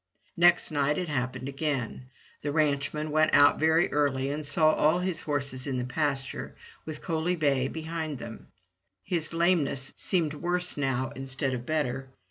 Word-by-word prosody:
Next 175 Hz, 0 st, +4 dB
night 145 Hz, 0 st, +1 dB
it 180 Hz, -3 st, -2 dB
happened 130 Hz, -2 st, -2 dB
again. 135 Hz, -3 st, -3 dB, 0.3 s
The 145 Hz, -, -2 dB
ranchman 150 Hz, 0 st, 0 dB
went 155 Hz, +1 st, +3 dB
out 145 Hz, -, +6 dB
very 160 Hz, +2 st, +3 dB
early 140 Hz, -2 st, +1 dB
and 150 Hz, +2 st, -3 dB
saw 155 Hz, +2 st, +3 dB
all 155 Hz, +3 st, +3 dB
his 180 Hz, -2 st, -1 dB
horses 140 Hz, -3 st, -3 dB
in 135 Hz, -2 st, -1 dB
the 125 Hz, -, -2 dB
pasture, 135 Hz, 0 st, -2 dB, 0.3 s
with 155 Hz, -1 st, -5 dB
Coaly 165 Hz, +1 st, 0 dB
bay 140 Hz, -5 st, +2 dB
behind 160 Hz, -1 st, -4 dB
them. 115 Hz, -2 st, -9 dB, 0.6 s
His 160 Hz, -, -1 dB
lameness 165 Hz, -6 st, +1 dB
seemed 165 Hz, -5 st, 0 dB
worse 175 Hz, +3 st, -1 dB
now 130 Hz, -3 st, -1 dB
instead 135 Hz, 0 st, -3 dB
of 125 Hz, -1 st, -5 dB
better. 135 Hz, -4 st, -1 dB
145 Hz, 155 wpm, -28 LUFS, 135-160 Hz, 0.6 s, out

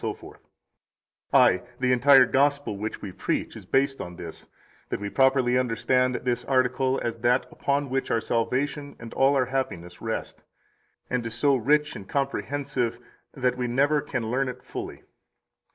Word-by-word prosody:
33 -, -, -5 dB, 1.0 s
Ay, 90 Hz, -, +5 dB, 0.2 s
the 125 Hz, 0 st, +2 dB
entire 130 Hz, +1 st, +7 dB
Gospel 140 Hz, -3 st, +1 dB
which 105 Hz, +2 st, -5 dB
we 100 Hz, -, -5 dB
preach 90 Hz, -, -2 dB
is -, -, -11 dB
based 135 Hz, 0 st, +1 dB
on 90 Hz, 0 st, -7 dB
this, 85 Hz, -2 st, -9 dB, 0.4 s
that -, -, -2 dB
we 100 Hz, 0 st, -5 dB
properly 130 Hz, -2 st, +3 dB
understand 125 Hz, +1 st, +1 dB
this 125 Hz, -1 st, -1 dB
article 130 Hz, 0 st, +1 dB
as 115 Hz, -1 st, -2 dB
that 120 Hz, +3 st, +2 dB
upon 140 Hz, 0 st, -1 dB
which 135 Hz, +1 st, -2 dB
our 115 Hz, -, +2 dB
salvation 135 Hz, +6 st, -2 dB
and 115 Hz, -1 st, -10 dB
all 135 Hz, +1 st, +3 dB
our 130 Hz, -2 st, +3 dB
happiness 90 Hz, -10 st, -4 dB
rest, 115 Hz, -1 st, -4 dB, 0.7 s
and 125 Hz, -1 st, -1 dB
which 115 Hz, -, -5 dB
is -, -, -9 dB
so 140 Hz, +1 st, +4 dB
rich 150 Hz, +5 st, +2 dB
and 95 Hz, -, -9 dB
comprehensive 135 Hz, -3 st, -2 dB, 0.4 s
that 125 Hz, -2 st, 0 dB
we 125 Hz, -, 0 dB
never 140 Hz, +5 st, +2 dB
can 120 Hz, -6 st, -3 dB
learn 130 Hz, +1 st, 0 dB
it 125 Hz, 0 st, -8 dB
fully. -, -, -7 dB
130 Hz, 165 wpm, -26 LUFS, 115-135 Hz, 1.0 s, entire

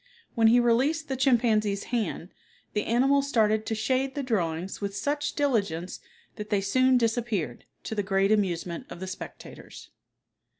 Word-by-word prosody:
When 225 Hz, -2 st, +4 dB
he 240 Hz, +2 st, +6 dB
released 265 Hz, +7 st, +1 dB
the 265 Hz, -, -1 dB
chimpanzee's 225 Hz, -6 st, +2 dB
hand, 205 Hz, -6 st, -2 dB, 0.4 s
the 210 Hz, -, -1 dB
animal 270 Hz, +5 st, +3 dB
started 220 Hz, -6 st, +1 dB
to 220 Hz, -, -1 dB
shade 260 Hz, +5 st, 0 dB
the 285 Hz, -, -2 dB
drawings 180 Hz, -7 st, -2 dB
with 200 Hz, 0 st, -3 dB
such 290 Hz, +6 st, -2 dB
diligence 200 Hz, -, -1 dB, 0.4 s
that 210 Hz, -1 st, -6 dB
they 205 Hz, -, +2 dB
soon 255 Hz, +6 st, +3 dB
disappeared, 225 Hz, -, -1 dB, 0.2 s
to -, -, -5 dB
the 210 Hz, -, 0 dB
great 195 Hz, +1 st, +1 dB
amusement 180 Hz, -5 st, -1 dB
of -, -, -9 dB
the 190 Hz, -, -5 dB
spectators. 185 Hz, 0 st, -10 dB
220 Hz, 155 wpm, -27 LUFS, 195-255 Hz, 0.4 s, he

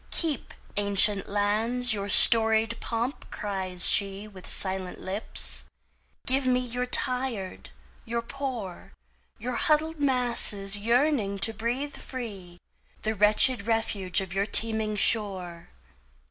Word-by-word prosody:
"Keep, 315 Hz, -6 st, -1 dB, 0.2 s
ancient 200 Hz, 0 st, +3 dB
lands, 220 Hz, +4 st, 0 dB
your 200 Hz, -1 st, -4 dB
storied 225 Hz, +1 st, +6 dB
pomp!" 235 Hz, +4 st, -4 dB
cries 190 Hz, -3 st, -4 dB
sheWith 195 Hz, -1 st, 0 dB
silent 190 Hz, -1 st, +1 dB
lips. 195 Hz, +3 st, -2 dB, 0.6 s
"Give 260 Hz, 0 st, +1 dB
me 250 Hz, 0 st, +2 dB
your 250 Hz, 0 st, -4 dB
tired, 250 Hz, -6 st, -2 dB, 0.3 s
your 235 Hz, 0 st, -4 dB
poor, 240 Hz, -, -7 dB, 0.4 s
Your 245 Hz, +1 st, -4 dB
huddled 315 Hz, -1 st, 0 dB
masses 240 Hz, -7 st, +1 dB
yearning 230 Hz, -1 st, 0 dB
to 225 Hz, -, -4 dB
breathe 245 Hz, +7 st, -4 dB
free, 200 Hz, -9 st, -9 dB, 0.5 s
The 220 Hz, -, -1 dB
wretched 210 Hz, +2 st, +3 dB
refuse 205 Hz, -5 st, -1 dB
of 190 Hz, -2 st, -7 dB
your 195 Hz, +1 st, -1 dB
teeming 220 Hz, -1 st, 0 dB
shore. 190 Hz, -6 st, 0 dB
220 Hz, 110 wpm, -26 LUFS, 200-250 Hz, 0.6 s, storied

